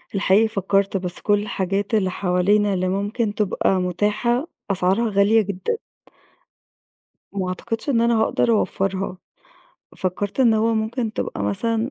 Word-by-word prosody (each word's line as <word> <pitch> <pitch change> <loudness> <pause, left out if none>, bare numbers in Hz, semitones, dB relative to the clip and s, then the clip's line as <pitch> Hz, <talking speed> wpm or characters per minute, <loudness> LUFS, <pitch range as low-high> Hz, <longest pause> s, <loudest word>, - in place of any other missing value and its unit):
الحقيقة 195 +3 +4
فكَّرت، 195 -1 0
بس 180 -1 -4
كل 205 -1 +2
الحاجات 200 +1 -2
اللي 190 -4 +2
حوالينا 200 +3 +2
اللي 185 0 0
ممكن 205 +3 -1
تبقى 200 -2 +1
مُتاحة، 210 - 0 0.2
أسعارها 195 +5 +1
غالية 210 +2 +4
جدًا. 200 - -3 1.5
وما 195 -2 -3
أعتقدش 225 +8 -4
إن 235 -4 +2
أنا 235 -1 +3
هاقدر 225 - +1
أوفَّرها. 195 -3 -1 0.8
فكَّرت 190 +5 -2
إن 235 -4 +5
هو 225 +1 +2
ممكن 220 +1 -2
تبقى 100 - -4
مثلًا 225 - 0
205 Hz, 130 wpm, -22 LUFS, 190-225 Hz, 1.5 s, إن